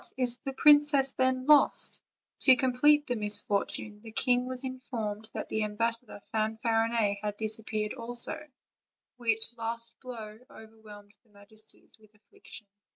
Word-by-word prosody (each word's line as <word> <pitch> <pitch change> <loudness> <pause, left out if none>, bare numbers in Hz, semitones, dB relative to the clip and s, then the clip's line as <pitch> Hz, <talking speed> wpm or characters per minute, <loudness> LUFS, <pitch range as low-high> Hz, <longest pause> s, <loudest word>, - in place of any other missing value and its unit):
is 245 -2 0
the 270 +2 -6
princess, 290 -1 +5
then, 260 -1 0
lost?" 295 0 +4 0.4
To 260 - +6
complete 270 +4 +3
the 245 - -1
misfortune, 210 0 -2
the 225 0 -11
king 250 +2 +2
was 255 0 -6
informed 225 -5 -5
that - - -4
the 220 - -1
ambassador 225 0 -1
Fanfarinet 225 -1 0
had 210 -1 -4
disappeared 215 -1 -2
also, 240 +4 -4 0.7
which 225 -1 +1
last 230 0 -2
blow 220 -4 -9
over 220 0 -14
whelmed 205 -1 -14
their 220 -3 -31
majesties 215 +2 -5
with 215 0 -23
affliction. 210 +1 -10
225 Hz, 135 wpm, -29 LUFS, 215-250 Hz, 0.7 s, To